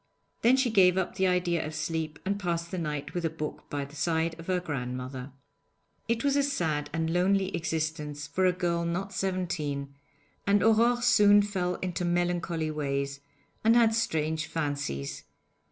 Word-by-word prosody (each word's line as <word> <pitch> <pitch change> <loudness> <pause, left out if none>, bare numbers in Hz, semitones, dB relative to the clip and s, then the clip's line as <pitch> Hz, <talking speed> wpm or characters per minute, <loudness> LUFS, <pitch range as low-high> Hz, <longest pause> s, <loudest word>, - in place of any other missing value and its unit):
Then 250 +3 +5
she 260 -3 +2
gave 185 -3 +5
up 190 - 0
the 190 - +1
idea 180 -2 +1
of 155 +1 -6
sleep, 160 -1 -2
and 200 +1 -1
passed 170 -3 -2
the 185 - -2
night 150 -3 -4
with 175 - -2
a 165 - +1
book 155 -1 -6
by 145 -1 -2
the 140 +1 -14
side 165 +1 0
of 165 - -10
her 185 -1 +1
grandmother. 130 -4 -5 0.8
It 230 0 0
was 280 -1 +2
a 285 - +4
sad 160 - -1
and 165 0 -1
lonely 190 +1 +2
existence 155 -3 -3
for 185 +6 +1
a - - +5
girl 170 -1 -1
not 185 +4 -2
seventeen, 155 -8 -2 0.5
and 200 -1 +4
Aurore 235 +2 +4
soon 205 -4 +6
fell 185 -3 -1
into 180 -1 -2
melancholy 175 -2 0
ways, 140 -2 -2 0.4
and 225 +1 +5
had 230 -2 +5
strange 160 -8 0
fancies. 145 - -3
170 Hz, 170 wpm, -28 LUFS, 150-190 Hz, 0.8 s, soon